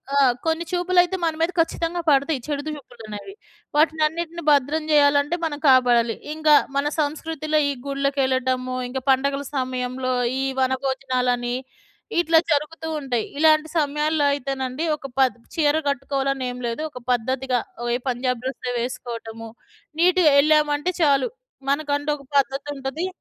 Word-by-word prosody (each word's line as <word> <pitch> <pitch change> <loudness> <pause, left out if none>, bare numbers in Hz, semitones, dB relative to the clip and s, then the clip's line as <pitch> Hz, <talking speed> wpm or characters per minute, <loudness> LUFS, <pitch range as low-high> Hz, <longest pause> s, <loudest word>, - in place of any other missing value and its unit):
ఆ! - - +3 0.3
కొన్ని 325 +1 0
చూపులైతే 360 +1 +2
మన 325 - +1
మీద 330 +2 +2
ఖచ్చితంగా 335 +1 0
పడతాయి 280 +1 +2
చెడు 290 -1 -2
చూపులనేవి. 245 - -8 0.4
వాటినన్నిటిని 320 +2 +1
భద్రం 290 +2 +2
జేయాలంటే 285 +1 +4
మనం 300 -2 -3
కాపాడాలి. 240 -3 +4 0.2
ఇంగ 310 0 -5 0.3
మన 280 +1 +1
సంస్కృతిలో 310 +1 -1
ఈ - - -2
గుళ్ళకెళ్ళటము, 260 -2 0
ఇంకా 265 +1 -4
పండగల 275 +1 +1
సమయంలో 255 0 -2 0.3
ఈ - - 0 0.2
వనభోజనాలని 255 -2 0 0.6
ఇట్లా 330 -1 +5
జరుగుతూ 310 +2 -1
ఉంటాయి. 245 -5 -2
ఇలాంటి 310 0 +4
సమయాల్లో 300 0 +1
అయితేనండి 270 0 -3
ఒక 275 - -8
పద్ 260 -1 +4 0.2
చీర 300 -1 +3
కట్టుకోవాలనేం 270 -2 -1
లేదు 235 +5 -3
ఒక 250 - -10
పద్ధతిగా 255 +1 0 0.4
ఏ - - +1
పంజాబ్ 250 -1 -1
డ్రెస్సో 255 -1 -4
వేసుకోవటము 235 -2 -6 0.5
నీట్‌గా 360 -2 +5
యెళ్ళామంటే 300 +3 +3
చాలు. 275 -3 +3 0.4
మనకంటూ 290 0 0
ఒక 275 - -16
పద్ధతుంటది 275 +3 -1
280 Hz, 120 wpm, -23 LUFS, 255-310 Hz, 0.6 s, ఇట్లా